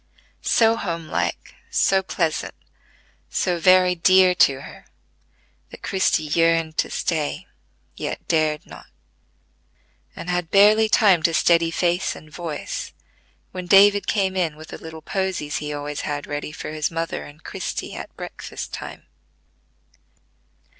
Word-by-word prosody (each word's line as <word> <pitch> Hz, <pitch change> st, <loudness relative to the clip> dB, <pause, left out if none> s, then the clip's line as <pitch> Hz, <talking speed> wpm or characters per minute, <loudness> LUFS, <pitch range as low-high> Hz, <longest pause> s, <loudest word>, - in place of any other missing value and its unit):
So 225 Hz, 0 st, +3 dB
homelike, 170 Hz, -5 st, -3 dB, 0.2 s
so 195 Hz, 0 st, +2 dB
pleasant, 165 Hz, -4 st, -2 dB, 0.7 s
so 175 Hz, -, 0 dB
very 185 Hz, +1 st, +5 dB
dear 185 Hz, +1 st, +5 dB
to 135 Hz, -6 st, +3 dB
her, -, -, -12 dB, 0.8 s
that -, -, -13 dB
Christie 190 Hz, -4 st, +1 dB
yearned 165 Hz, +1 st, +1 dB
to -, -, +1 dB
stay, 155 Hz, -3 st, -2 dB, 0.5 s
yet -, -, -5 dB
dared 155 Hz, -2 st, +1 dB
not, -, -, -13 dB, 1.3 s
and -, -, -8 dB
had 180 Hz, -2 st, -1 dB
barely 210 Hz, +2 st, +5 dB
time 200 Hz, -7 st, +5 dB
to 165 Hz, 0 st, +2 dB
steady 165 Hz, +1 st, +3 dB
face 175 Hz, +2 st, 0 dB
and 155 Hz, -, -14 dB
voice, 160 Hz, -3 st, -5 dB, 0.6 s
when 180 Hz, -1 st, -6 dB
David 205 Hz, +1 st, +6 dB
came 190 Hz, -3 st, 0 dB
in 170 Hz, -5 st, 0 dB
with 155 Hz, +1 st, -12 dB
the -, -, -8 dB
little 160 Hz, -1 st, -10 dB
posies 190 Hz, -6 st, -2 dB
he 150 Hz, 0 st, -4 dB
always 145 Hz, 0 st, -4 dB
had 145 Hz, -1 st, -4 dB
ready 145 Hz, +1 st, -5 dB
for 150 Hz, -, -7 dB
his 155 Hz, -1 st, -1 dB
mother 165 Hz, -1 st, -3 dB
and 150 Hz, +2 st, -15 dB
Christie -, -, -5 dB
at -, -, -8 dB
breakfast -, -, -7 dB
time. -, -, -8 dB
170 Hz, 135 wpm, -22 LUFS, 155-190 Hz, 1.3 s, David